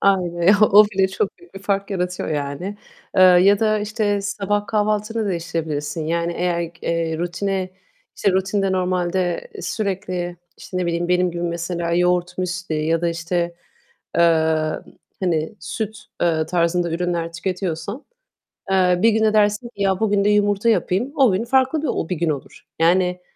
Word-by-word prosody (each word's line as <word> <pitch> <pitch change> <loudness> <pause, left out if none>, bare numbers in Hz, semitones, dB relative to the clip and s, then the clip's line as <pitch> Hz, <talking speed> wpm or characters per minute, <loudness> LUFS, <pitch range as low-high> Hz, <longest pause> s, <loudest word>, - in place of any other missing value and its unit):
Aynen, 180 -1 +3
o 210 0 +8
bile 195 -2 +1
çok 190 +1 -2
büyük 355 0 -20
bir 195 - -6
fark 200 0 -1
yaratıyor 180 -1 -2
yani. 150 +7 -3 0.4
Eee, 185 - +6
ya 185 +2 +6
da, 215 -1 +2
işte, 210 -1 -1
sabah 205 +1 -1
kahvaltını 215 +1 0
değiştirebilirsin. 160 -3 -3
Yani, 170 +1 -1
eğer 170 -1 -1
k 160 - -23
eee, 165 -1 -1
rutine, 185 +2 -2 0.5
işte, 200 - +2
rutinde 195 +1 0
normalde 180 - -1
sürekli, 185 - -3 0.2
işte, 185 - -8
ne 180 -1 0
bileyim, 170 +1 -1
benim 180 0 +2
gibi 170 0 -5
mesela 170 0 -2
yoğurt, 180 0 +1
müsli 180 -2 -3
ya 165 0 +1
da, 170 - +1
işte, 170 +1 -2 0.6
eee, 160 -2 +2 0.4
hani, 165 -1 -1
süt, 220 +6 -4 0.3
eee, 160 -2 +1
tarzında 170 0 +1
ürünler 170 -1 -2
tüketiyorsan, 185 - -4 0.7
eee, 180 -2 +3
bir 230 - +6
gün 220 0 +2
de 215 -1 +3
dersin 210 +2 +2
ki 220 -4 -10
"Ya, 190 -1 +2
bugün 205 -2 +2
de 205 - +3
yumurta 205 +1 +2
yapayım." 215 +5 0
O 265 -7 +5
gün 190 +5 0
farklı 265 +4 +2
bir 315 - -2
o 165 - -2
bir 180 - 0
gün 165 +1 0
olur. 145 -3 -6 0.2
Yani, 180 +1 +3
180 Hz, 160 wpm, -21 LUFS, 170-205 Hz, 0.7 s, o